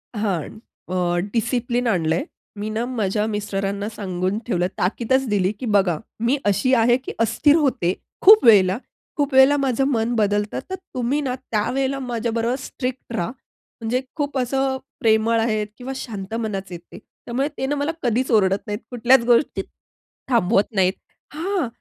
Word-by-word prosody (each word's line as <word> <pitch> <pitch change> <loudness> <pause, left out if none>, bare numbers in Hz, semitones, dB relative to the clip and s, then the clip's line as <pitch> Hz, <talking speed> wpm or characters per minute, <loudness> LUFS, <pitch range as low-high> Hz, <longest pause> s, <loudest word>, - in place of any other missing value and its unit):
हां. 200 -7 -1 0.5
अ, 185 - -2 0.4
डिसिप्लिन 240 +1 0
आणलंय. 165 -5 +1 0.4
मी 215 +1 -3
ना, 225 +2 -2
माझ्या 215 -4 -1
मिस्टरांना 205 -1 -2
सांगून 190 -2 -2
ठेवलं 180 -6 0
आहे. 185 - -1
ताकीदचं 250 +8 +1
दिली 195 -2 +2
की 260 - -4
"बघा, 195 -7 +2 0.2
मी 240 +5 +1
अशी 255 +6 +2
आहे 240 +1 +4
की 260 - -7
अस्थिर 235 +7 +3
होते 255 - +1 0.3
खूप 425 +3 +8
वेळेला, 195 -3 +6 0.4
खूप 285 -1 0
वेळेला 265 +2 +6
माझं 270 -1 +1
मन 235 -3 0
बदलतं, 205 -1 0
तर 375 - -2 0.2
तुम्ही 255 +4 0
ना, 255 -2 -2
त्यावेळेला 260 +3 -1
माझ्याबरोबर 235 -1 -1
स्ट्रिक्ट 250 -2 -5
राहा." 220 +1 -2 0.5
म्हणजे 240 +3 0
खूप 290 -3 -2
असं 265 +1 0 0.2
प्रेमळ 225 +1 +3
आहेत 215 -2 0
किंवा 260 +1 -6
शांत 215 -5 -6
मनाचे 200 -5 -3
आहेत 170 - -7
ते, - - -10 0.3
त्यामुळे 260 +4 -1
ते 265 - -1
ना, 285 +2 0
मला 290 +2 -1
कधीच 245 +2 0
ओरडत 195 -2 +3
नाहीत, 205 0 -3
कुठल्याच 245 +1 +4
गोष्टीत 240 +4 +2 0.7
थांबवत 225 -3 +2
नाहीत. 190 -1 +3 0.4
हां, 345 -2 -1
230 Hz, 155 wpm, -22 LUFS, 205-260 Hz, 0.7 s, खूप